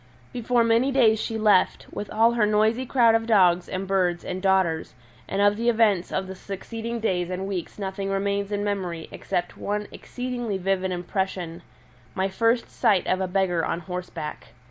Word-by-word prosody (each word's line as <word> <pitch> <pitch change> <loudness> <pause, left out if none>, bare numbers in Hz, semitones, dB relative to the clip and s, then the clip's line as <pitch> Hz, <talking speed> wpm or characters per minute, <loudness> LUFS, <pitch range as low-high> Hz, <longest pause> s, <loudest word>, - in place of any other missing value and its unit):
Before 240 0 +1
many 230 +4 +3
days 225 -5 +4
she 225 - -3
left, 210 -4 +3
with 205 - -5
all 225 +2 +4
her 230 -3 +2
noisy 220 +4 +2
crowd 235 -3 +4
of 225 0 +1
dogs 180 -5 +4
and 185 +1 -3
birds 180 -3 0
and 185 - -4
daughters, 190 -7 +1 0.3
and 200 +1 +1
of 205 0 +4
the 235 +1 +1
events 215 -6 +2
of 190 - -1
the 190 - -7
succeeding 225 +5 -6
days 180 -5 -1
and 185 +1 -3
weeks 190 -4 -5
nothing 195 -1 -4
remains 200 +1 -1
in 205 0 -1
memory 185 -5 -3
except 175 0 -3
one 210 0 -3
exceedingly 245 -4 -4
vivid 190 0 0
impression 180 -1 -3 0.5
my 190 +1 0
first 230 +4 +1
sight 195 -4 +2
of 185 +1 0
a 190 - 0
beggar 180 -3 +1
on 170 - -2
horseback. 180 -3 -6
195 Hz, 175 wpm, -25 LUFS, 185-225 Hz, 0.5 s, days